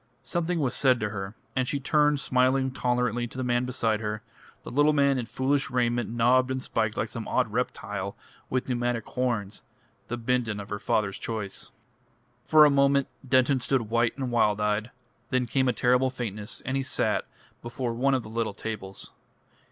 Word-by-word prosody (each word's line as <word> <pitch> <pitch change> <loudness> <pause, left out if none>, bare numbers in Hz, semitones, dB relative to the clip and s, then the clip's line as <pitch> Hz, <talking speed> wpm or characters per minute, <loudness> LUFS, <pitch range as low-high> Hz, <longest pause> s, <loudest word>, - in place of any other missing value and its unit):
Something 175 0 -1
was 135 -5 0
said 130 -3 +3
to 105 - -1
her, 100 0 -5 0.2
and 130 -1 +1
she 140 - -1
turned 150 +1 +3
smiling 130 +1 +2
tolerantly 125 -2 0
to 125 - -11
the 130 - -1
man 120 0 +1
beside 115 -3 0
her, 105 -1 -4 0.4
a - - -6
little 145 +3 +4
man 140 -2 +3
in 120 - -4
foolish 135 +3 0
raiment 120 -2 0
knobbed 125 +3 +3
and 130 0 -1
spiked 110 -4 -1
like 110 - 0
some 115 -1 -6
odd 125 -5 0
reptile 105 -5 -3 0.3
with 130 -1 -1
pneumatic 120 -2 -1
horns 115 -5 -2 0.5
the 120 - -3
Bindon 115 -3 0
of 100 0 -8
her 105 - -3
father's 100 -2 0
choice. 105 -4 -4 0.8
For 155 -1 +8
a 145 - +5
moment 140 0 +3 0.2
Denton 130 +1 +4
stood 125 -3 0
white 115 +1 +2
and 130 -3 -3
wild 105 -3 +3
eyed; 105 +2 0 0.4
then 130 -1 +1
came 130 +2 +1
a - - +4
terrible 125 +2 +3
faintness, 110 -4 -5
and 130 - -1
he 135 - +1
sat 130 - 0 0.3
before 120 0 -3
one 135 +3 +2
of 130 - -1
the - - -10
little 115 -2 -2
tables. 100 -3 -6
125 Hz, 185 wpm, -27 LUFS, 110-130 Hz, 0.8 s, For